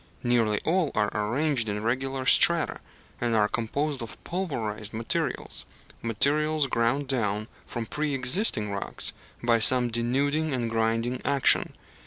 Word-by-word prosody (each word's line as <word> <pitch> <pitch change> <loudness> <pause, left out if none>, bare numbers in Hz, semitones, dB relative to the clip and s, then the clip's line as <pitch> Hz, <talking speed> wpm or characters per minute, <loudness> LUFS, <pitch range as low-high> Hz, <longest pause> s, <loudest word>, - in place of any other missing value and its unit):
Nearly 115 -4 +2
all 165 -2 +1
are 105 -1 +1
arranged 120 +3 0
in 105 +1 -3
regular 130 +3 -2
strata, - - +5 0.4
and 120 -1 0
are 105 -1 +3
composed 135 +6 -2
of 115 - -8
pulverized 115 - -4
materials 115 +1 -2 0.4
materials 150 +7 +1
ground 130 +3 0
down 110 -5 -1 0.2
from 120 -1 -5
pre 150 +4 -2
existing 125 - +1
rocks 100 -1 -2 0.3
by 120 -1 +3
some 125 +1 +4
denuding 140 +6 0
and 120 -2 -2
grinding 115 +2 -1
action. 140 -1 +3
120 Hz, 130 wpm, -26 LUFS, 115-140 Hz, 0.4 s, strata